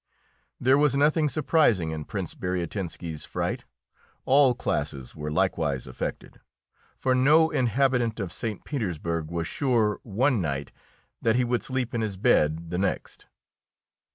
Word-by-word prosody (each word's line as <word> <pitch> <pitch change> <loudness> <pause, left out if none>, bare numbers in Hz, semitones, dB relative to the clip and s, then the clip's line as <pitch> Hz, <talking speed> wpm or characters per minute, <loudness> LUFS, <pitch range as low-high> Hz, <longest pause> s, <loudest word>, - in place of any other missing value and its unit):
There 130 +3 +4
was 145 -2 +3
nothing 150 +1 +3
surprising 135 - +2
in 80 -1 -5
Prince - - -4
Bariatinski's 90 -3 -4
fright. - - -3 0.6
All 135 -2 +5
classes 65 - -3
were 75 -1 -4
likewise 75 -6 0
affected, 65 - -6 0.5
for 130 - +1
no 150 +5 +5
inhabitant 125 -2 +1
of 95 -6 -4
St. 110 -3 -4
Petersburg 85 - -3
was 85 -1 -2
sure 115 -1 +1
one 120 +2 +1
night 70 -4 -3 0.5
that 115 0 +2
he 125 - +3
would 120 0 0
sleep 130 -2 -2
in 115 - 0
his 105 -3 -3
bed 80 -2 +2
the 90 - -1
next. 100 - -3
110 Hz, 135 wpm, -26 LUFS, 85-130 Hz, 0.6 s, All